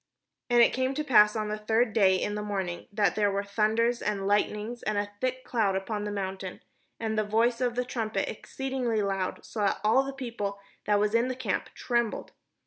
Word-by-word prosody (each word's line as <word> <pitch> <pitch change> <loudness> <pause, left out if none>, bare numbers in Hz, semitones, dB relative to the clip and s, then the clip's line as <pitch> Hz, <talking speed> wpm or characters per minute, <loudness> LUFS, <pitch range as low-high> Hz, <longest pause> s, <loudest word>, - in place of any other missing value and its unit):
And 240 -1 +6
it - - +4
came 260 +1 0
to 305 - -1
pass 210 -7 +5
on 215 -1 -2
the 215 0 -3
third 220 +1 +1
day 195 -4 +5
in 205 - -1
the 210 - -3
morning, 190 -4 -3
that 205 -3 +2
there 205 -1 +2
were 200 0 -1
thunders 220 +4 +1
and 210 -2 -1
Ughtnings, 210 +3 0
and 215 -1 0
a 205 0 -1
thick 255 0 -1
cloud 215 -5 +1
upon 205 +2 -3
the 210 - -3
mount, 195 -1 -4 0.6
and 220 -1 -1
the - - +2
voice 230 +3 +1
of 245 -1 0
the 250 0 0
trumpet 220 -5 -2
exceeding 265 +3 -4
loud; 200 -5 -1
so 220 - -7
that 200 -1 +1
all 220 +5 +5
the 270 0 -4
people 230 -7 -4 0.3
that 205 -1 +4
was 210 +1 +1
in 230 +2 +3
the 255 - -2
camp 245 -6 -2
trembled. 235 -3 -1
215 Hz, 210 wpm, -28 LUFS, 205-240 Hz, 0.6 s, And